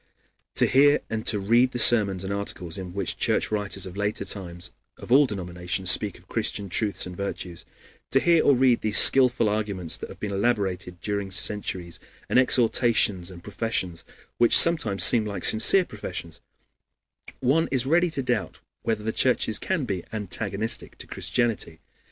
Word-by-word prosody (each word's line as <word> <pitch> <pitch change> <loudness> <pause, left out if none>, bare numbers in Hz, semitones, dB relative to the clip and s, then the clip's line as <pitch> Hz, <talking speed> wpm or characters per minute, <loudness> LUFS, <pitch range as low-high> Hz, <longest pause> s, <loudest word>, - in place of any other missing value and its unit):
To - - +4
hear 145 +3 +3
and 110 0 -4
to 105 - +4
read 120 +6 +2
the - - -3
sermons 105 -6 +3
and 95 +1 -4
articles 90 -4 -5
in 95 -2 -8
which 95 -2 -3
Church - - -1
writers 100 -2 -3
of 95 -1 -10
later 105 +1 -3
times 90 -3 -6 0.3
of - - -12
all 140 +2 +5
denominations 90 -2 -1
speak 100 0 +1
of 90 - -23
Christian 105 -3 -3
truths 105 +2 -1
and 90 -1 -9
virtues; 90 -3 -7 0.4
to 135 - +3
hear 170 +2 +3
or 140 - +4
read 125 -1 +2
these 110 -1 +3
skillful 125 -3 +5
arguments 105 -5 -1
that - - -9
have - - -13
been 105 - -5
elaborated 95 -4 -2
during 100 -2 -4
centuries, 95 -3 -1 0.3
and - - +2
exhortations 115 -7 +2
and 90 -2 -13
professions, 95 -4 -4 0.4
which 120 - +6
sometimes 115 - +4
seem 110 +7 +6
like 105 -2 -4
sincere 175 - +5
professions, 90 - -9 1.0
one 140 +6 +1
is 130 -2 +1
ready 170 +5 +2
to 140 -4 -3
doubt 120 -6 -3 0.2
whether 110 -2 -3
the 110 +1 -3
churches 120 -4 +1
can 175 -8 -2
be 95 -6 -4
antagonistic 110 0 -2
to - - -9
Christianity. 115 -9 -3
105 Hz, 165 wpm, -24 LUFS, 95-120 Hz, 1.0 s, which